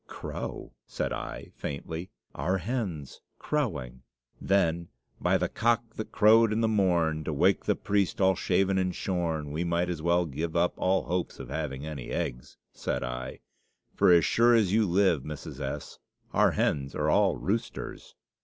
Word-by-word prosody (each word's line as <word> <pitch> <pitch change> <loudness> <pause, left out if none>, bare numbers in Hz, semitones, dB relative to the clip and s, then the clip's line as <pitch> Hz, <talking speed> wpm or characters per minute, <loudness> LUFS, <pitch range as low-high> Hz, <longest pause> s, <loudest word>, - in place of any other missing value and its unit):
"Crow!" - - -6
said - - -2
I, - - -6
faintly, 80 +5 -5 0.2
"our 95 +2 0
hens 95 - -4 0.2
crowing! 65 - -2 0.4
Then, 85 -3 +1 0.3
by 90 +2 +2
'the 90 -1 -1
cock 115 0 0
that 110 - -6
crowed 110 +3 +5
in 110 +1 +1
the 115 - +3
morn, 85 -7 +2
to - - -1
wake 75 - +2
the - - +2
priest 100 -3 0
all 95 -1 +5
shaven 95 +1 +1
and 90 -1 -1
shorn,' 80 -5 -2
we 80 +3 -2
might 85 +1 0
as 85 -3 -3
well 85 +1 +2
give 80 +3 -4
up 85 +1 +2
all 95 +1 +1
hopes 90 0 -2
of 65 -3 -8
having 70 -1 -4
any 75 -5 -6
eggs," - - -4 0.2
said - - -3
I; 60 +1 -5 0.5
"for - - +4
as 85 -2 +6
sure 120 +1 +4
as 105 -5 +3
you 110 -1 +3
live, 90 -4 +3
Mrs. 75 -1 -8
S., 70 +1 -5 0.3
our - - +4
hens 70 -1 0
are - - +1
all - - +3
roosters!" 110 +5 -4
90 Hz, 165 wpm, -28 LUFS, 75-100 Hz, 0.5 s, as